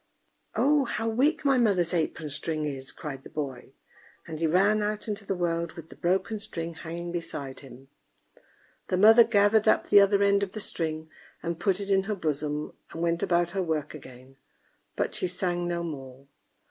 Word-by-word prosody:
"Oh! 290 0 +3
how 225 -1 -2
weak 265 +7 +1
my 270 -2 +4
mother's 190 -7 +2
apron 160 -2 -1
string 155 +1 -3
is!" 135 -2 -4
cried 135 -3 -7
the - - -11
boy; 135 -3 -6 0.5
and 160 -2 -7
he 165 - +2
ran 200 +6 +3
out 210 +1 -2
into 205 -1 -4
the 195 - 0
world, 170 -1 -1
with 165 -1 -11
the - - -11
broken 190 +5 0
string 165 -4 -6
hanging 170 +1 -6
beside 145 -6 -5
him. 135 -1 -13 1.0
The 185 - 0
mother 220 +4 +8
gathered 215 0 +3
up - - +3
the 205 - +8
other 200 0 +4
end 200 0 +3
of 200 -1 -3
the 215 - -5
string 160 -5 -4 0.3
and 170 -1 -3
put 195 +1 +1
it 200 0 -3
in 195 0 +3
her 210 +1 -2
bosom, 150 -3 -2 0.2
and 165 - -4
went 170 0 0
about 175 -1 +1
her 195 - -1
work 155 -4 -2
again; 130 -2 -13 0.6
but - - -1
she - - -1
sang 175 -1 -1
no 170 0 -2
more. 135 -4 -8
175 Hz, 185 wpm, -27 LUFS, 155-200 Hz, 1.0 s, mother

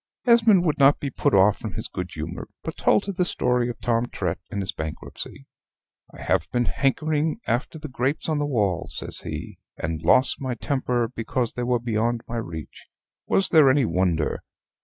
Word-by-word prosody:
Esmond 225 -6 +5
would 155 -3 0
not 140 +1 +6
be 140 - -3
put - - +1
off 100 +2 +5
from 110 -4 -5
his - - -4
good - - -5
humor, - - -6 0.2
but - - -5
told 105 - +3
her 200 - -2
the 180 -1 0
story 125 -7 +1
of 120 - -6
Tom 120 0 +1
Trett 90 -6 -3
and 100 - -4
his 95 - -1
bankruptcy. 80 -3 -7 0.7
"I - - -11
have - - +1
been 120 -1 +1
hankering 155 - 0
after 120 +7 -1
the 155 0 -7
grapes 135 +2 -1
on 155 -2 0
the 145 - 0
wall," 100 -9 0
says 80 - -4
he, - - -6 0.2
"and 80 0 -3
lost 130 +14 +3
my 130 -2 -2
temper 125 -2 0
because 115 +1 -2
they 125 - -4
were 120 0 +2
beyond 115 0 -1
my 120 - -4
reach; 80 -9 -7 0.4
was 195 - +2
there 155 -5 +6
any 130 0 +4
wonder? 85 -4 0
120 Hz, 190 wpm, -24 LUFS, 105-145 Hz, 0.7 s, not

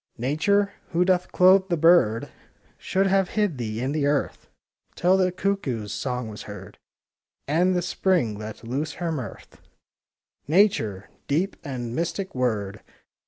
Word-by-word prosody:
Nature, 200 - +1 0.2
who 175 +2 +3
doth 180 -1 +1
clothe 190 +1 +5
the 170 - +1
bird, 160 -9 +4 0.5
Should 195 +1 0
have 195 -1 +2
hid 205 -11 +1
thee 110 -2 -3
in 130 +3 -1
the 145 -1 0
earth. 145 -1 -1 0.5
Till 180 +2 +3
the 185 -1 +2
cuckoo's 145 - -2
song 125 -3 -3
was 105 -1 -8
heard, 100 -2 -10 0.7
And 175 +5 +2
the 175 - 0
Spring 175 - +1
let 110 +2 -8
loose 140 +7 -3
her 170 -2 -3
mirth. 130 -10 -7 0.9
Nature,— 145 - +2 0.2
deep 170 +8 0
and 125 -5 -5
mystic 180 +3 -3
word! 105 -6 -2
155 Hz, 140 wpm, -25 LUFS, 115-185 Hz, 0.9 s, clothe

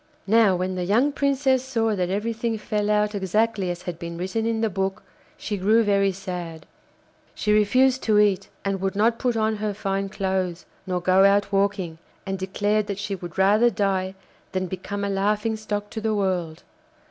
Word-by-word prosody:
Now 215 -2 +4
when 185 +1 -2
the 180 -1 -2
young 230 +10 +2
Princess 275 -2 +1
saw 225 -4 0
that 180 -2 -1
everything 225 +3 -1
fell 210 0 -2
out 210 0 +2
exactly 200 0 0
as 175 0 -5
had 170 -2 -6
been 170 -1 -6
written 190 +6 -2
in 225 -1 0
the 225 - +2
book, 190 +1 -2 0.3
she 210 - -4
grew 215 +5 +3
very 200 -1 +2
sad. 175 -4 -6 0.7
She 210 - +1
refused 255 +5 +3
to 215 -2 +3
eat, 205 -2 +2 0.2
and 195 -1 -1
would 195 0 -1
not 225 +3 +2
put 245 -2 0
on 220 0 +1
her 210 -1 -2
fine 195 -1 -2
clothes 190 -3 -2 0.2
nor 180 -1 -1
go 185 +2 +4
out 200 +1 +3
walking, 195 -4 0 0.3
and 195 -1 -3
declared 205 +2 0
that 200 - -3
she 205 0 -4
would 175 -3 -7
rather 210 +5 +5
die 195 -3 -1 0.4
than 185 0 -1
become 190 +3 -5
a - - 0
laughing 210 +3 0
stock 210 -1 -4
to 220 - -5
the 220 0 0
world. 180 -5 -2
200 Hz, 185 wpm, -24 LUFS, 190-215 Hz, 0.7 s, rather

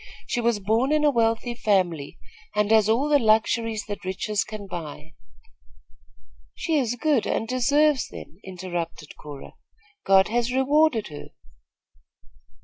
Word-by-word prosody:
She 240 - -2
was 235 -2 +1
born 225 +7 +1
in 305 0 +2
a 295 - +4
wealthy 230 0 0
family, 180 -10 0 0.4
and 210 0 +1
has 220 -1 +4
all 245 +6 +2
the 295 -1 +4
luxuries 220 -1 +1
that 205 -1 -7
riches 190 +3 -2
can 215 -2 -8
buy 160 -4 -8 0.8
" - - -34
"She 325 - -1
is 245 -5 0
good 280 -1 +1
and 225 - -1
deserves 280 +3 +2
them," 170 - -12
interrupted 175 -4 -6
Cora. 145 -2 -11 0.5
"God 190 0 +4
has 240 +2 0
rewarded 265 - +2
her." 145 -1 -9
220 Hz, 140 wpm, -24 LUFS, 190-255 Hz, 0.8 s, a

